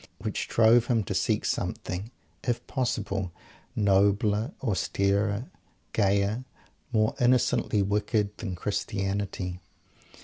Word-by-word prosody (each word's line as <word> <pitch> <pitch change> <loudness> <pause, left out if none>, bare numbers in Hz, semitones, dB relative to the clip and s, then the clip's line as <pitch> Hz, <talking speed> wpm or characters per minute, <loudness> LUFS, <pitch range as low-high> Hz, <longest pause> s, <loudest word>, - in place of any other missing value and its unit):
which - - -3
drove 115 +1 +5
him 115 -4 +2
to - - -3
seek - - +1
something 95 +5 -2 0.3
if 120 -2 -1
possible 105 -8 -2 0.4
nobler, 100 +3 +3
austerer, 100 -1 0 0.5
gayer, 100 +3 +2 0.5
more 110 -2 +2
innocently 120 -4 +3
wicked, 105 +1 0
than 95 -6 -4
Christianity! 95 -1 -2
105 Hz, 95 wpm, -28 LUFS, 100-110 Hz, 0.5 s, drove